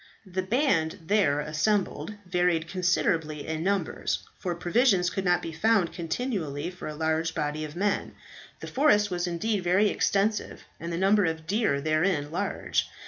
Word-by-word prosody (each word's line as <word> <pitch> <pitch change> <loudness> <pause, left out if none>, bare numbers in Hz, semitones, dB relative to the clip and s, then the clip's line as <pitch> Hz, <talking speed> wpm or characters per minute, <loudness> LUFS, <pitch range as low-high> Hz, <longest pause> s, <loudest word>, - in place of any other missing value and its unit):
The 185 0 -2
band 190 - +1
there 170 -7 +2
assembled 185 +7 -1
varied 180 -2 +1
considerably 165 -4 0
in 160 0 -3
numbers, 195 -1 -1
for 180 -3 -2
provisions 180 0 +2
could 195 - -2
not 175 -1 +2
be 165 - -4
found 195 +1 +2
continually 170 - -3
for 180 - -8
a 155 - -5
large 160 +1 0
body 150 +1 -2
of 155 0 -7
men. 200 +3 -1 0.5
The - - -6
forest 210 -8 +3
was 175 0 -1
indeed 185 +3 -1
very 185 +4 +3
extensive, 205 +2 0 0.2
and 170 +1 -5
the 170 - -2
number 195 +2 +4
of 160 -1 -2
deer 200 -6 +1
therein 155 0 +1
large. 170 - -1
175 Hz, 155 wpm, -27 LUFS, 160-200 Hz, 0.5 s, number